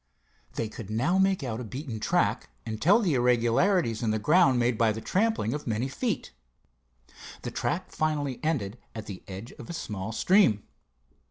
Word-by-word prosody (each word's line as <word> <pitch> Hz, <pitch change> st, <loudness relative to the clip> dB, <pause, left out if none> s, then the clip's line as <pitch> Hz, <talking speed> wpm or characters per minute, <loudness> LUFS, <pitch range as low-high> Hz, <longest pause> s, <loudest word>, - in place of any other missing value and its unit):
They 115 Hz, -, -1 dB
could 110 Hz, -1 st, -9 dB
now 135 Hz, -, +1 dB
make 190 Hz, -4 st, +2 dB
out 115 Hz, -3 st, -3 dB
a -, -, -4 dB
beaten 125 Hz, 0 st, -6 dB
track, 105 Hz, -, +1 dB, 0.2 s
and 110 Hz, -1 st, -5 dB
tell 200 Hz, +9 st, +5 dB
the 180 Hz, -8 st, +1 dB
irregularities 120 Hz, -, +2 dB
in 115 Hz, -, 0 dB
the 110 Hz, -, +1 dB
ground 135 Hz, -, +4 dB
made 120 Hz, 0 st, +2 dB
by 110 Hz, 0 st, +3 dB
the 110 Hz, -, -4 dB
trampling 195 Hz, -, 0 dB
of 150 Hz, -1 st, -5 dB
many 115 Hz, +3 st, 0 dB
feet. 215 Hz, -, -3 dB, 1.1 s
The -, -, -4 dB
track -, -, -2 dB
finally 145 Hz, -4 st, -1 dB
ended 125 Hz, -9 st, -1 dB, 0.2 s
at 110 Hz, -1 st, -6 dB
the 95 Hz, -3 st, -8 dB
edge 100 Hz, +4 st, -8 dB
of 120 Hz, -, -10 dB
a -, -, -4 dB
small 105 Hz, -, -4 dB
stream. 180 Hz, -, +3 dB
120 Hz, 175 wpm, -28 LUFS, 110-160 Hz, 1.1 s, tell